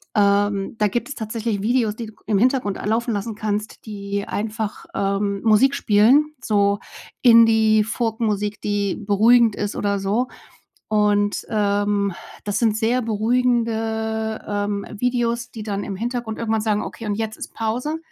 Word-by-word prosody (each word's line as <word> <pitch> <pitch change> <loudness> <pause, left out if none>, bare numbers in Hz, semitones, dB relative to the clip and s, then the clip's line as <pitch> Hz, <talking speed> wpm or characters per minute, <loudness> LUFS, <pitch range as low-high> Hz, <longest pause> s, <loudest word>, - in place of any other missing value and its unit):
Ähm, 200 0 +2
da 210 -1 +2
gibt 240 +7 -2
es 280 - -5
tatsächlich 220 -2 -3
Videos, 225 -1 +1
die 230 0 -6
du 215 - -12
g - - -29
im 210 -2 +2
Hintergrund 245 -4 +1
a - - -6
laufen 230 +2 0
lassen 205 +1 -3
kannst, 210 +1 -4
die 200 -1 -4
einfach, 215 0 -4
ähm, 200 0 -1
Musik 230 +5 +4
spielen, 265 +7 +4
so 200 -1 +2 0.4
Indie 225 -3 +6
Folk 225 0 -2
Musik, 210 -2 -1
die 205 -2 -1
beruhigend 220 +2 +4
ist 205 -1 -3
oder 200 -1 0
so. 210 +6 0 0.6
Und, 205 -1 +1
ähm, 205 -2 +1 0.3
das 205 -1 -1
sind 225 -3 +2
sehr 235 +3 +1
beruhigende, 220 -1 0
ähm, 205 -1 -2
Videos, 240 -1 0
die 220 - -8
dann 200 -1 -3
im 200 - -5
Hintergrund 235 +1 -3
irgendwann 220 -1 0
sagen: 210 -1 0
„Okay, 225 - -7
und 205 - -1
jetzt 220 0 -3
ist - - -8
Pause, 245 +8 -2
215 Hz, 160 wpm, -22 LUFS, 205-230 Hz, 0.6 s, Indie